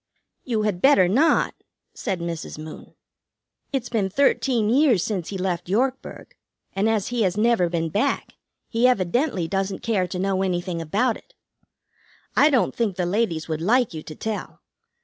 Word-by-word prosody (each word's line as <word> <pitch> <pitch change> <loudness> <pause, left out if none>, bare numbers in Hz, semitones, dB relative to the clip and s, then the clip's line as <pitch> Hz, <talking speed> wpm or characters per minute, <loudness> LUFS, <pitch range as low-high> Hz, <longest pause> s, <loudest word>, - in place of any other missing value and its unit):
"You 225 -4 -1
had 200 -4 -1
better 235 -10 +6
not," 275 - +3 0.4
said 190 -6 -3
Mrs. 170 -2 -5
Moon. 155 0 -10 0.8
"It's 265 -4 -2
been 210 -5 0
thirteen 250 -1 +2
years 245 - +4
since 190 -6 -3
he 195 - -4
left 180 -2 -2
Yorkburg, 255 +6 -2 0.4
and, 200 +3 +1
as 215 -3 0
he 240 -1 -1
has 190 -1 +1
never 215 -5 +3
been 165 -1 -1
back, 220 - -1 0.3
he 235 +2 +2
evidently 205 - +1
doesn't 195 +1 -2
care 200 -6 +1
to 180 - -5
know 190 0 0
anything 175 -2 -2
about 210 +10 0
it. - - -23 1.0
I 295 - +6
don't 265 -5 +1
think 220 -6 0
the 180 - -1
ladies 175 -4 -1
would 160 -1 -3
like 235 +3 +2
you 155 - -5
to 155 - -10
tell. 220 +3 -5
200 Hz, 165 wpm, -23 LUFS, 175-240 Hz, 1.0 s, better